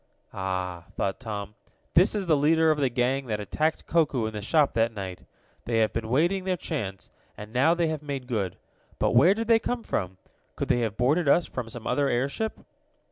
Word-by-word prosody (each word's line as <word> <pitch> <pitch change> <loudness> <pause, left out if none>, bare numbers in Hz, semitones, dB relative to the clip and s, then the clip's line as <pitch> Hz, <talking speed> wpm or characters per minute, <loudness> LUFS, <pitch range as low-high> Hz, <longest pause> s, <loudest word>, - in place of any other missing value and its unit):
"Ah!" 90 -2 -3
thought 95 - -2
Tom. 105 -4 -5 0.4
"This 185 +6 +5
is 200 -2 -1
the 165 -3 +4
leader 160 +2 +4
of 155 - 0
the 135 -2 +2
gang 125 +2 0
that 105 -2 -2
attacked 155 +10 -1
Koku 145 -8 +1
in 110 - -4
the 105 - -4
shop 145 +6 +2
that 115 0 +2
night. 95 -3 -6 0.4
They 115 -1 0
have 110 -1 +2
been 110 -1 -3
waiting 170 +9 +2
their 185 -1 -1
chance, 95 - -5 0.3
and 105 +1 -9
now 140 +7 +4
they 170 -1 +1
have 155 -2 -3
made 140 -3 -5
good. 105 -8 -2 0.4
But - - +1
where 145 +11 +6
did 225 0 -3
they 230 -1 +5
come 245 0 -3
from? 95 - -3 0.4
Could - - -3
they 120 - +3
have 110 -3 -2
boarded 145 +5 +2
us 170 +4 +4
from 120 -3 -5
some 115 -1 -9
other 145 -1 +1
airship?" 140 - -1
130 Hz, 205 wpm, -26 LUFS, 110-160 Hz, 0.4 s, where